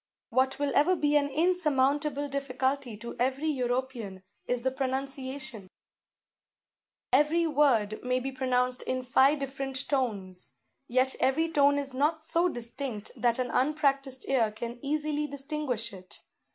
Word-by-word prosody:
What 260 +3 +2
will 285 -1 0
ever 365 +5 +4
be 295 -3 +1
an 285 -1 +3
insurmountable 290 -3 +1
difficulty 270 -3 -2
to 235 +2 -8
every 265 +5 0
European 245 -7 -2 0.2
is 245 -1 -1
the 260 - +1
pronunciation; 265 -4 -3 1.4
every 300 +5 +4
word 255 -9 +2
may 250 0 +1
be 270 +2 -4
pronounced 255 -1 +1
in 255 0 -2
five 265 +4 +4
different 270 -1 -4
tones, 205 -10 -2 0.3
yet 255 +2 +2
every 320 +5 +2
tone 285 -2 +4
is 275 -2 -2
not 305 +4 +1
so 335 +2 +3
distinct 240 -3 -5
that 235 -1 +1
an 255 -1 -2
unpractised 275 -1 +1
ear 245 -5 +3
can 235 +3 -6
easily 300 +1 -1
distinguish 275 -5 -3
it. 185 -1 -11
265 Hz, 135 wpm, -29 LUFS, 250-290 Hz, 1.4 s, ever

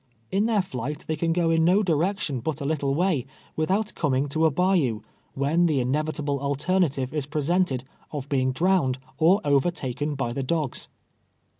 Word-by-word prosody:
In 200 +3 +2
their 215 -4 +2
flight 140 -1 -5
they 160 - 0
can 165 +2 0
go 165 -1 +2
in 165 0 +3
no 185 +5 +4
direction 170 -4 0
but 155 +4 -3
a 140 - -4
little 140 -2 0
way 160 -6 +1 0.3
without 195 +7 0
coming 140 -2 0
to 160 +3 +2
a - - +3
bayou, 155 - +1 0.3
when 155 +6 +2
the 150 -4 +1
inevitable 145 +2 -1
alternative 140 -1 0
is 150 -3 -2
presented, 150 -2 0 0.3
of 145 -3 -5
being 130 -2 +1
disowned 165 -3 +2 0.2
or 175 +6 +5
overtaken 145 -1 0
by 130 -3 -2
the 135 - -2
dogs. 150 0 -2
150 Hz, 165 wpm, -25 LUFS, 135-175 Hz, 0.3 s, or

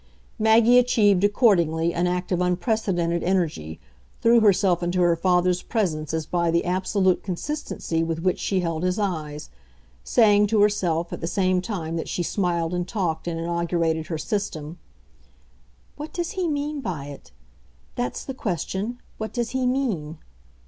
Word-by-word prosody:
Maggie 225 +3 +6
achieved 205 -6 +3
accordingly 170 -7 +3
an 175 +1 0
act 180 +1 -2
of 180 -1 +1
unprecedented 180 -2 0
energy, 160 - -1 0.4
threw 235 +1 +5
herself 195 -4 +3
into 175 +1 -1
her 175 -1 +4
father's 180 +1 +2
presence 155 - -2
as 160 -1 -2
by 170 +1 0
the 170 +1 +1
absolute 185 +1 +1
consistency 190 - -3
with 165 0 -3
which 185 -1 +1
she 190 -2 0
held 165 -2 -2
his 180 +1 0
eyes; 155 -7 -3 0.5
saying 210 - +4
to 215 +1 +1
herself, 175 -5 +1
at - - -6
the 165 - -2
same 185 0 +1
time 170 -5 -4
that 165 - -4
she 175 - -2
smiled 170 -2 -1
and 180 0 -2
talked 175 -6 -2
and 165 -1 -2
inaugurated 165 -1 -1
her 165 - -3
system, 165 -3 -4 1.2
"What 300 +1 -7
does 345 -1 -3
he 375 -4 -2
mean 295 -1 -2
by 170 - -4
it? 140 - -11 0.6
That's 125 0 -3
the 265 - -5
question 205 - -3 0.2
what 220 0 -4
does 240 -2 -2
he 260 -1 0
mean?" 210 - -1
180 Hz, 155 wpm, -24 LUFS, 165-210 Hz, 1.2 s, Maggie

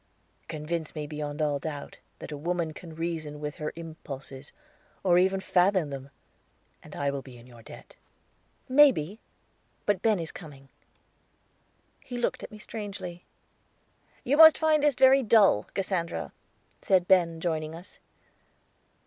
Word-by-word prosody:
"Convince 160 +1 -4
me 150 -1 -4
beyond 150 0 -4
all 145 -2 0
doubt 145 -1 -7 0.2
that - - -9
a - - -4
woman 165 +1 -2
can 165 0 -11
reason 160 -3 -4
with 150 0 -5
her 150 0 -4
impulses, 145 -4 -9 0.5
or 180 -2 +4
even 190 +1 +2
fathom 185 -4 +2
them, 135 0 -7 0.7
and - - -12
I 140 -1 -1
will 140 -1 -4
be 130 -2 -13
in 120 - -15
your 120 -2 -15
debt." - - -13 0.7
"Maybe 255 - +4 0.7
but 205 -3 +1
Ben 220 -2 +3
is 165 -2 -5
coming." 140 -6 -12 1.3
He 245 - -7
looked 240 - -1
at - - -8
me 215 - -11
strangely. 195 -5 -7 1.0
"You 280 +4 +1
must 320 0 +9
find 315 -2 +3
this 295 -2 +3
very 265 +1 +6
dull, 210 - +4
Cassandra," 170 - -2 0.5
said 185 -2 +2
Ben, 170 -3 +3
joining 160 -2 -2
us. 175 +3 -12
165 Hz, 140 wpm, -28 LUFS, 150-195 Hz, 1.3 s, must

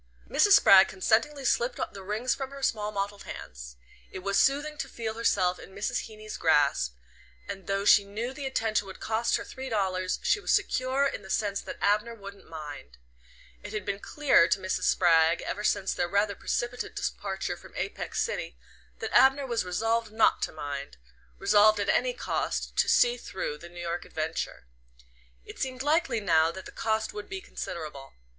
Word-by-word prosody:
Mrs. 410 - +4
Spragg 195 - +8
consentingly 250 +9 0
slipped 245 0 +1
the 200 - -8
rings 215 +6 -1
from 270 -1 -5
her 275 0 -10
small 210 -4 0
mottled 200 0 -4
hands. - - -9 0.3
It 185 - -8
was 200 0 +2
soothing 290 +2 +2
to 275 - -3
feel 225 -3 -4
herself 190 -5 +1
in 190 - -13
Mrs. 200 - -2
Heeny's 215 0 -9
grasp, 145 - +2 0.5
and 190 - -7
though 195 0 -1
she 205 - +7
knew 220 +6 -5
the 275 0 -5
attention 220 -5 0
would 190 - -10
cost 225 +2 0
her - - -6
three 265 0 -7
dollars 185 -4 0
she 415 - +2
was - - -2
secure 260 +2 +1
in 275 - -2
the 190 - -13
sense 200 -1 0
that - - -8
Abner 210 +3 +1
wouldn't 200 -2 -12
mind. 150 - -9 0.6
It - - -9
had 215 - -3
been 200 - -2
clear 285 - +3
to 185 +3 +1
Mrs. 185 0 -2
Spragg, 165 -2 +4
ever 210 - -4
since 200 -2 +1
their 175 - -1
rather 200 +2 +1
precipitate 240 +4 -3
departure 195 -2 -3
from - - -15
Apex - - -2
City, - - -4 0.4
that - - -5
Abner 270 +1 +5
was 235 -5 -1
resolved 225 +5 -1
not 220 0 +3
to - - -1
mind 145 - -6 0.4
resolved 210 - +5
at 200 - -1
any - - +2
cost - - -3
to - - +3
"see 245 0 +4
through" 170 -9 -5
the 170 - -11
New 175 0 -9
York 175 0 -3
adventure. 160 - -4 0.8
It - - -11
seemed 260 0 -3
likely 290 -5 +2
now 165 -5 +3
that 190 +2 -9
the - - -9
cost 220 0 -1
would 210 0 -7
be 375 - -4
considerable. 155 - -7
205 Hz, 180 wpm, -28 LUFS, 180-240 Hz, 0.8 s, Spragg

